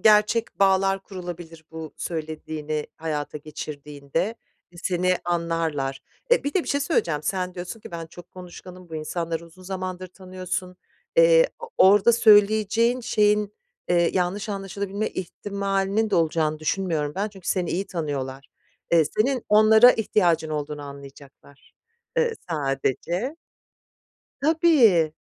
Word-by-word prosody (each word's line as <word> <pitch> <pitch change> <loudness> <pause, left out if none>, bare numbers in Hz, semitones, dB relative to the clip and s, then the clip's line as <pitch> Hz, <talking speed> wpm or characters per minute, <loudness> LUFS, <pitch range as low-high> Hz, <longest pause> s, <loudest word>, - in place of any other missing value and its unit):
gerçek 215 +1 +3
bağlar 195 0 +3
kurulabilir 175 -4 -9
bu 160 -1 -8
söylediğini 155 -2 -4
hayata 150 -2 -4
geçirdiğinde, 150 +5 -5 0.4
seni 180 +1 +1
anlarlar. 165 -6 -1 0.3
E, - - +4
bir 285 - -2
de 375 - +2
bir - - -9
şey 285 - +1
söyleyeceğim, 170 - 0
sen 185 +1 -2
diyorsun 180 +5 -7
ki - - -11
ben 165 -1 -6
çok 175 +1 -14
konuşkanım, 180 0 -11
bu 160 - -9
insanları 165 +1 -3
uzun 175 +3 -17
zamandır 185 -1 -5
tanıyorsun. 185 0 -6 0.4
Eee, - - +6
o 470 - -7
orada 205 +4 +6
söyleyeceğin 220 +2 +4
şeyin, 210 -2 +2 0.4
eee, 170 -1 +3
yanlış 190 +4 -1
anlaşılabilme 200 +1 -3
ihtimalinin 200 +3 -2
de - - +1
olacağını 155 -2 +1
düşünmüyorum 155 -2 -1
ben 200 +2 -1
çünkü 195 -4 -10
seni 180 -3 0
iyi 190 +3 -2
tanıyorlar. 140 -5 -4 0.4
Eee, 165 -2 +6
senin 255 +2 +1
onlara 220 +3 +7
ihtiyacın 175 -7 +1
olduğunu 150 -1 -4
anlayacaklar, 140 0 -13 0.4
eee, 475 -1 +2 0.2
sadece. 160 - -1 1.1
Tabii. 275 - +4
180 Hz, 125 wpm, -24 LUFS, 160-210 Hz, 1.1 s, onlara